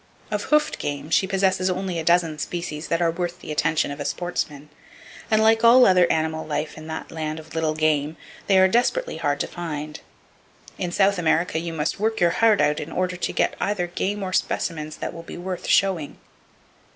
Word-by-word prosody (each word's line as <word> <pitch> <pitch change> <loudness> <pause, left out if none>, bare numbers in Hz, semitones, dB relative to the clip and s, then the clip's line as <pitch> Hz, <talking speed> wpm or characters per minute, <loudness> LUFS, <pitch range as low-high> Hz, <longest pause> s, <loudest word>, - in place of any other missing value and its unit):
Of - - -2
hoofed 300 0 +2
game 145 +2 -4
she 190 - +3
possesses 190 -1 +1
only 185 -1 -2
a - - -3
dozen 165 -2 +2
species 155 -2 -4
that 165 +1 0
are 165 - +2
worth 175 +1 -4
the 155 - -8
attention 150 -1 +1
of 145 0 -4
sportsmen; 150 -5 -4 0.6
and 220 0 +3
like 225 0 +4
all 245 +2 +8
other 180 -2 +5
animal 160 0 -1
life 150 0 -3
in 155 0 -10
that 160 0 -6
land 155 -1 -4
of 160 0 -13
little 160 -1 0
game, 155 0 0 0.3
they 195 - +4
are 190 0 +6
desperately 250 - 0
hard 145 0 -1
to - - 0
find. 155 -3 -6 0.8
In 175 - -2
South 195 +1 +2
America 165 0 +1
you 170 0 -4
must 155 +1 -2
work 220 +1 0
your 175 -1 +4
heart 220 +2 +3
out 150 0 +2
in 150 - -6
order 180 0 -1
to 175 - -2
get - - 0
either 195 -3 0
game 195 +3 -3
or 185 -1 -4
specimens 155 -4 -2
that - - -5
will 165 - -8
be 165 - -9
worth 180 0 -5
showing. 185 -7 +1
170 Hz, 200 wpm, -23 LUFS, 155-190 Hz, 0.8 s, all